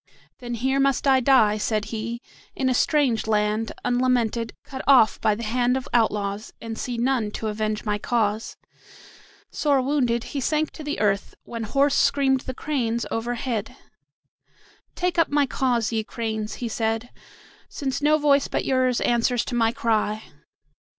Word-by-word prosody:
"Then 240 -2 -5
here 265 +4 0
must 275 0 +2
I 265 -1 +5
die," 235 -5 +4
said 215 0 -1
he, 230 +2 -4 0.3
"in 260 -1 0
a - - +2
strange 255 -4 +2
land, 215 +1 0
unlamented, 245 -2 +1
cut 265 -2 -7
off 255 -6 +5
by 215 - +2
the 230 - -6
hand 245 +3 +1
of 265 - -6
outlaws, 210 -2 0
and 225 -1 -6
see 240 +2 -4
none 240 -3 +1
to 220 - -3
avenge 215 0 -2
my 210 -1 -1
cause." 220 -1 -1 0.9
Sore 285 -3 +2
wounded, 255 -4 +1
he 280 - -2
sank 310 +3 0
to 310 - -10
the 295 0 -3
earth, 200 -1 0
when 230 -1 -5
hoarse 275 +5 +2
screamed 270 -2 +2
the 260 - -4
cranes 235 -6 -1
overhead. 230 -1 -3 1.2
"Take 360 -1 0
up 330 - +3
my 290 0 +3
cause, 245 -4 0
ye 220 -1 0
cranes," 220 -2 -4
he 245 - -4
said, 225 +1 -2 0.6
"since 270 -1 -3
no 300 +1 +4
voice 285 -2 +3
but - - -2
yours 255 -2 +1
answers 240 0 +1
to - - -6
my 225 -1 +2
cry." 220 -2 0
240 Hz, 160 wpm, -24 LUFS, 220-265 Hz, 1.2 s, I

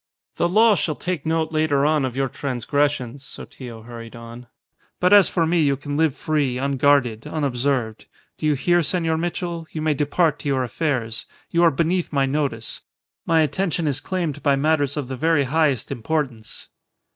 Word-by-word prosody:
"The 170 - +2
law 220 +4 +5
shall 155 -4 -1
take 175 -2 -4
note 160 0 0
later 155 -3 +2
on 150 -2 +2
of 125 -2 -4
your 135 0 +1
transgressions," 140 0 -1
Sotillo 120 -5 -9
hurried 115 -1 -10
on. 115 +1 -10 0.5
"But 180 +3 +4
as 200 -2 +7
for 170 -3 +1
me, 165 +1 +2
you 140 -2 +2
can 145 +1 -5
live 155 -2 +2
free, 145 -6 0
unguarded, 135 -3 +2
unobserved. 135 -6 -1 0.3
Do 155 - 0
you 150 - +3
hear, 175 +5 +2
Senor 165 0 0
Mitchell? 170 -1 -3
You 155 - -5
may 155 -1 +2
depart 150 +2 +1
to 145 - -3
your 130 -2 +1
affairs. 125 -4 -2 0.2
You 170 - +2
are 170 - +6
beneath 170 +4 0
my 140 -2 +2
notice. 135 -5 -2 0.5
My 165 -1 +4
attention 170 +1 0
is 145 -1 -1
claimed 165 -6 -3
by 140 -1 +3
matters 145 0 +1
of 145 -4 -3
the 130 - -4
very 160 +1 +2
highest 140 -3 +1
importance." 130 -4 -4
145 Hz, 175 wpm, -22 LUFS, 130-160 Hz, 0.5 s, as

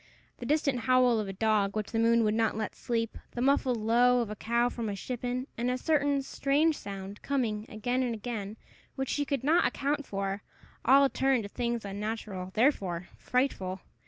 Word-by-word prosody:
The 240 - -6
distant 285 -4 +1
howl 250 -2 +5
of 210 - -2
a 195 - -4
dog 210 -1 +1
which 215 -2 -3
the 225 - 0
moon 230 0 +4
would 210 -1 +2
not 220 -1 +1
let 215 -1 -3
sleep, 230 -2 -2
the 240 - -3
muffled 265 -2 +2
low 240 +3 +4
of 230 -3 -2
a - - -4
cow 235 +3 +1
from 235 -3 -3
a 200 - -3
shippen, 245 +4 -3
and 240 +1 0
a 250 - 0
certain 285 -1 +1
strange 290 +4 +1
sound, 200 -2 -7
coming 225 -6 -1
again 245 +4 -1
and 245 -3 -1
again, 215 -2 -5 0.4
which 265 -1 -3
she 290 - 0
could 275 -3 -2
not 320 +5 +4
account 285 0 -2
for, 195 0 -3 0.4
all 275 +3 +6
turned 265 -3 +1
to 200 - -7
things 235 -1 -2
unnatural, 200 -2 -4
therefore 195 - +1
frightful. 195 -8 -1
235 Hz, 190 wpm, -29 LUFS, 210-260 Hz, 0.4 s, all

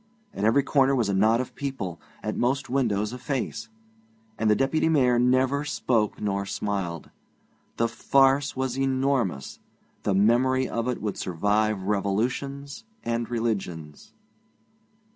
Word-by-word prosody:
At 100 - -2
every 125 +6 +4
corner 135 -1 +3
was 115 -5 +1
a - - +1
knot 110 +4 +3
of 130 - -7
people, 105 - -5 0.2
at - - -2
most 130 +2 0
windows 110 -5 0
a 125 - -7
face. 130 -4 -3 0.7
And 110 0 0
the 105 - +5
Deputy 155 +6 +1
Mayor 125 -6 +3
never 130 +3 +2
spoke 115 -7 0
nor 100 -1 -1
smiled. 95 -6 -3 0.7
The 115 - +2
farce 135 +3 +2
was 130 0 -2
enormous; 130 - 0 0.4
the 100 - 0
memory 130 +6 +3
of 115 +1 -2
it 125 - -2
would 105 -2 -2
survive 105 +3 0
revolutions 120 +8 -2 0.2
and 115 0 -2
religions. 95 -10 -4
120 Hz, 135 wpm, -26 LUFS, 105-135 Hz, 0.7 s, the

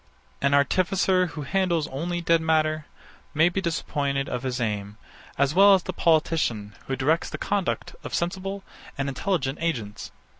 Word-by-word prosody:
An 140 0 +3
artificer, 185 +5 +2
who 150 -2 -7
handles 175 -1 0
only 175 +6 -3
dead 165 -1 +3
matter, 155 -1 +1 0.5
may 160 +3 +5
be 190 +2 -2
disappointed 140 -5 -1
of 125 - -3
his 130 -1 -3
aim, 105 -2 -3 0.4
as 140 +1 +2
well 195 +2 +7
as 185 - -1
the 185 - -4
politician, 155 - +1
who 135 - -1
directs 150 +6 +1
the - - -5
conduct 200 -3 -2
of - - -4
sensible 190 +3 -3 0.3
and 135 0 -1
intelligent 140 -1 -1
agents. 115 -12 -3
160 Hz, 155 wpm, -25 LUFS, 135-180 Hz, 0.5 s, well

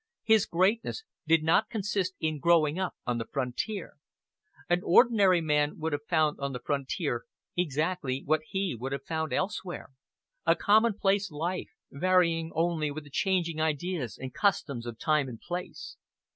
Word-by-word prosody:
His 220 -2 +4
greatness 200 - +1 0.2
did 165 -1 +4
not 170 +7 +3
consist 200 -4 -1
in 155 -2 -1
growing 165 +1 +3
up 190 - -2
on 120 -1 -1
the 115 - -4
frontier. 140 - -3 0.7
An 175 0 +2
ordinary 200 -4 +5
man 150 -2 +1
would 160 0 -2
have 145 +1 -4
found 155 -3 +2
on 140 -1 -3
the 125 - -4
frontier 140 0 -2 0.3
exactly 155 -4 -1
what 155 +1 +2
he 190 -2 -1
would 130 +4 -4
have 140 - -5
found 160 -1 -2
elsewhere 190 -5 -3 0.5
a - - +4
commonplace 205 -2 +3
life, 170 +4 -3 0.2
varying 165 0 +2
only 165 -2 +1
with 150 +1 -6
the 145 - -15
changing 170 -1 0
ideas 155 - -2
and 130 -1 -7
customs 150 - 0
of 115 -2 -6
time 150 -2 +1
and 115 -3 -9
place. 180 +1 -6
165 Hz, 155 wpm, -29 LUFS, 145-185 Hz, 0.7 s, ordinary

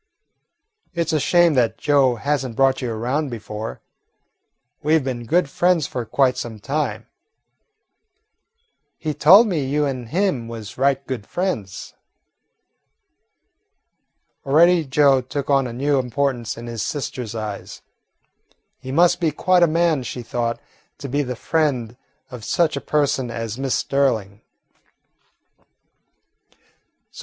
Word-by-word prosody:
"It 170 -1 -1
's - - 0
a 155 - +2
shame 175 +2 +4
that 125 -4 +1
Joe 140 -4 +3
has 140 +3 -1
n't 125 -3 -6
brought 135 +1 +2
you 125 -2 -2
around 130 +7 -2
before. 110 -1 -7 1.0
We 155 +2 +3
've 155 - -2
been 120 -3 -4
good 175 +2 +2
friends 175 +1 +2
for 125 -2 -4
quite 130 +3 +2
some 115 -2 -5
time." 125 -3 -2 1.9
"He 155 -1 -3
told 190 +11 +7
me 175 -9 -1
you 145 +3 0
an' 130 -4 -4
him 155 - -1
was 110 -3 -8
right 135 +1 +1
good 125 -6 -5
friends." 145 - -4 2.5
Already 165 +4 +4
Joe 135 -1 +4
took 140 +3 -4
on 135 -2 +3
a - - -6
new 140 +3 +1
importance 125 -2 -2
in 115 - -8
his 115 -2 -5
sister's 125 -7 -4
eyes. 105 -2 -6 1.0
He 130 - -7
must 175 +4 +4
be 165 -3 +2
quite 180 +4 +2
a 170 - +6
man, 165 -2 +1
she 125 0 -6
thought, 115 0 -2 0.4
to 140 - -7
be 145 +3 0
the 125 -3 -4
friend 125 -5 -1 0.4
of 125 -3 -9
such 160 +6 +1
a 140 - -4
person 145 -4 0
as 115 0 -5
Miss 135 -1 0
Sterling. 110 -8 0
135 Hz, 135 wpm, -21 LUFS, 120-150 Hz, 2.5 s, told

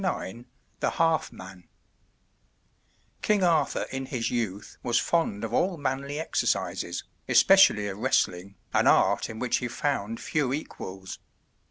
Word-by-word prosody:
IX 115 +6 -3 0.3
THE - - +1
HALF 165 -1 +2
MAN 95 -1 -12 1.5
King 210 -2 +2
Arthur 160 -5 +2
in 135 0 -4
his 120 -4 -2
youth 105 -5 -3
was 120 -2 +1
fond 160 -12 0
of 115 0 -4
all 180 +6 +1
manly 140 +1 -3
exercises, 160 - -1 0.3
especially 190 - +6
of 100 0 -6
wrestling, 100 -6 0 0.2
an - - +3
art - - +3
in 110 - -7
which 125 +1 0
he 125 - -3
found 115 -3 -2
few 145 -4 -1
equals. 95 -10 -7
125 Hz, 135 wpm, -27 LUFS, 105-150 Hz, 1.5 s, especially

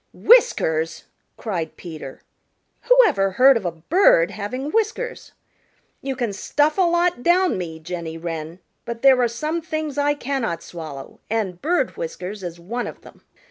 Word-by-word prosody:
"Whiskers!" 165 - +3 0.3
cried 180 -8 -4
Peter. 155 -6 -9 0.7
"Who - - +7
ever 195 - +1
heard 265 +5 +6
of 225 -5 -2
a 175 - 0
bird 170 - +3
having 255 +8 -5
whiskers? 450 +2 -2 0.7
You 270 0 -3
can 240 -5 -2
stuff 295 - 0
a - - +6
lot 345 -4 +2
down 360 +4 +3
me, 170 -3 -5
Jenny 165 0 -6
Wren, 165 0 -5 0.3
but 235 0 -7
there 265 -2 +6
are 240 - +3
some 305 +8 -3
things 310 -3 -3
I 290 0 +2
cannot 245 - -3
swallow, 155 -5 -9
and 205 -5 -2
bird 350 +3 0
whiskers 210 - -6
is 175 -2 -7
one 235 +8 -4
of - - -9
them." - - -16
235 Hz, 155 wpm, -22 LUFS, -, 0.7 s, Who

